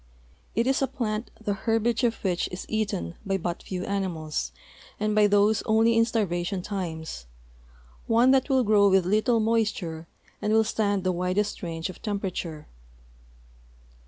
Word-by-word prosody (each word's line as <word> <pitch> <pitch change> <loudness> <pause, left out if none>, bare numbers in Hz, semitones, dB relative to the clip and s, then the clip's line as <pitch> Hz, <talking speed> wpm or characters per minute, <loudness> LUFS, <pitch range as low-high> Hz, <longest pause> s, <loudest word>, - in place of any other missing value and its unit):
It 230 - +2
is 265 +1 +1
a 270 - +2
plant 220 -3 -3
the 210 -2 -1
herbage 225 +4 0
of 230 -2 +2
which 180 -3 0
is 180 - -6
eaten 200 - -2
by 195 -1 0
but 175 -1 -3
few 185 -1 -5
animals 160 - -2 0.5
and 215 0 0
by 210 -1 +5
those 205 +1 +3
only 225 +1 +4
in 230 0 +5
starvation 185 -5 -1
times, 160 - -5 0.8
one 235 +3 +5
that 270 +2 +3
will 260 -2 +3
grow 205 -2 +5
with 190 -2 +4
little 215 +5 +2
moisture 210 -8 -1 0.3
and 210 - +1
will 220 0 +5
stand 205 -3 0
the 185 - +1
widest 185 +4 -1
range 165 -2 -3
of 185 - -10
temperature. 185 -7 -4
205 Hz, 155 wpm, -26 LUFS, 180-220 Hz, 0.8 s, by